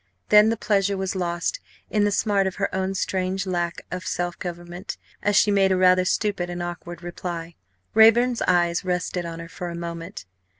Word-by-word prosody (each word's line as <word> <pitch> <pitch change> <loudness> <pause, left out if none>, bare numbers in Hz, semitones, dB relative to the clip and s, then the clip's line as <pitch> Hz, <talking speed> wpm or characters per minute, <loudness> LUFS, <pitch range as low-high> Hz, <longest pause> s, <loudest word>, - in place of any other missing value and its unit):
Then 210 +1 +7
the 225 - 0
pleasure 200 -2 +1
was 190 0 -2
lost 175 - -1 0.3
in 210 -1 +3
the 205 - +2
smart 200 -1 +2
of 190 - -4
her 195 - -2
own 190 +1 -1
strange 190 0 -1
lack 175 -2 -2
of 180 0 -4
self 175 -1 -3
government 175 +1 -6 0.2
as 205 0 +1
she 210 0 +5
made 195 -1 +3
a 185 - +3
rather 185 0 +5
stupid 190 -2 0
and 175 0 -4
awkward 175 0 -7
reply. 170 -1 -5 0.4
Raeburn's 230 +2 +5
eyes 175 -1 +2
rested 180 -1 -2
on 165 0 -6
her 165 - -7
for 175 +1 -6
a 170 - -6
moment. 170 - -6
185 Hz, 185 wpm, -24 LUFS, 175-200 Hz, 0.4 s, Then